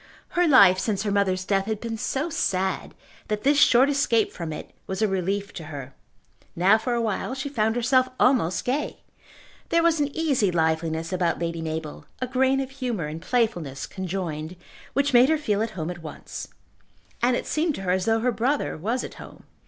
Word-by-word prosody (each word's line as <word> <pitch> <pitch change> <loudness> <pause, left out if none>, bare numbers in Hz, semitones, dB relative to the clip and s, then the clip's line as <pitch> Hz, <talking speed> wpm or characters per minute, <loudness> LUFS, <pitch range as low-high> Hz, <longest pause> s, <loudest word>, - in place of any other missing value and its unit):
Her 350 0 +2
life 200 - +7
since 210 -1 -1
her 205 - -1
mother's 190 -2 +1
death 195 -1 +1
had 220 -2 -2
been 230 0 -4
so 275 +8 -2
sad, 190 -7 -1 0.3
that 210 0 -2
this 285 +1 +4
short 255 +1 +6
escape 275 -6 +2
from 170 -2 -6
it 155 - -7 0.2
was 190 +3 -2
a - - +4
relief 195 +1 -2
to 165 - -7
her. 140 -3 -8 0.6
Now 195 +6 +4
for 240 +2 -1
awhile 230 +2 -1
she 270 +1 -4
found 220 -4 0
herself 255 +2 +3
almost 235 -10 +2
gay. 275 +4 -2 0.7
There 335 0 +3
was 335 -2 +3
an 290 - +2
easy 280 -11 +2
liveliness 160 0 0
about 175 -2 +1
Lady 170 -1 -3
Mabel, 160 -1 -5
a 255 - -1
grain 265 +1 +2
of 270 -1 -3
humour 245 - -3
and 155 +2 -6
playfulness 175 - -1
conjoined, 175 -2 -4 0.4
which 280 0 +1
made 245 +3 +7
her 315 - +3
feel 210 -9 0
at 225 - 0
home 160 +1 -2
at 175 -1 -9
once. 155 - -8 0.7
And 245 +1 +3
it - - -3
seemed 310 -1 0
to - - -6
her 180 - 0
as 185 0 +1
though 225 0 +2
her 250 +1 +2
brother 255 +6 0
was 225 +10 -1
at - - -7
home. - - -12
215 Hz, 195 wpm, -25 LUFS, 175-255 Hz, 0.7 s, life